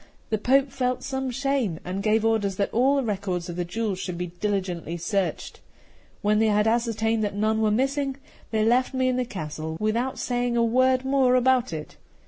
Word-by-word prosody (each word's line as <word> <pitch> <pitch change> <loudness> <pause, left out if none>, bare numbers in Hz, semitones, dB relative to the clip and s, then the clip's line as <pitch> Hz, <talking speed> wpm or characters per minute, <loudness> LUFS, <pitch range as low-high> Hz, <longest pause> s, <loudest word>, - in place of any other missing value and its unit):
The 215 - +1
Pope 265 +4 +3
felt 255 -2 -1
some 265 -1 -3
shame, 255 - -1
and 185 +2 -3
gave 220 +1 +2
orders 210 -4 +1
that 200 +1 -1
all 260 +5 +3
the 275 - +1
records 190 -5 -2
of 170 - -5
the 175 - -1
jewels 195 +2 -3
should 180 -2 -4
be 180 - -2
diligently 185 -5 -2
searched. 185 +3 -2 0.6
When 210 +1 +3
they 220 - +3
had 210 0 +3
ascertained 225 -1 +1
that 205 -1 -2
none 220 +1 +1
were 215 - +3
missing, 270 +4 0 0.3
they 215 -1 +1
left 250 +3 +2
me 260 0 +2
in 255 - 0
the 250 - 0
castle 160 -5 -5
without 230 +5 -1
saying 245 -1 -1
a 235 - +3
word 255 +2 +3
more 265 -2 +3
about 255 0 +3
it. 155 -2 -7
225 Hz, 195 wpm, -25 LUFS, 200-255 Hz, 0.6 s, Pope